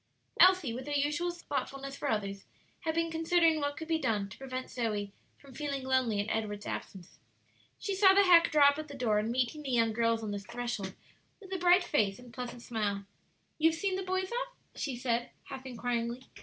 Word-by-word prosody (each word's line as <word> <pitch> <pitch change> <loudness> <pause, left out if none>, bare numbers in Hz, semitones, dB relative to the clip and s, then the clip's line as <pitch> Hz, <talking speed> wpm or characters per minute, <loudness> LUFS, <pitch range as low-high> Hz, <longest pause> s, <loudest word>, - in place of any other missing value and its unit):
Elsie, 365 -9 +6
with 255 +3 -6
her 290 - -2
usual 295 +5 +1
thoughtfulness 275 -5 -4
for 285 - -3
others, 200 -3 -2 0.3
had 320 -2 -2
been 330 0 0
considering 325 0 +3
what 285 0 -2
could 320 - -6
be 325 -1 +1
done 220 -8 0
to 195 - -12
prevent 255 -1 -5
Zoe 210 -4 -2 0.3
from 275 -2 -16
feeling 280 0 -3
lonely 260 -5 +1
in 205 - -1
Edward's 210 -2 -2
absence. 185 -2 -7 0.6
She 400 - -3
saw 385 0 +6
the 400 - +7
hack 345 -3 +6
draw 290 -2 +7
up 285 +1 -2
at 310 - -5
the 285 -1 -9
door, 220 -5 +2
and 215 +2 -1
meeting 255 +4 -1
the 280 - -6
young 230 -3 +2
girls 230 0 +1
on 210 - -3
the 205 - -3
threshold 215 -2 -4 0.4
with 390 -2 -9
a 375 - -2
bright 355 +1 +5
face 205 - +1
and 245 -1 -14
pleasant 245 -1 -6
smile: 205 -3 -2 0.5
"You 320 +1 +6
have 320 0 -4
seen 395 -2 0
the 380 - -2
boys 375 +1 -2
off?" - - -3 0.2
she 275 -4 -3
said, 240 -1 -1
half 265 -1 -8
inquiringly. 240 0 -2
260 Hz, 210 wpm, -31 LUFS, 230-325 Hz, 0.6 s, the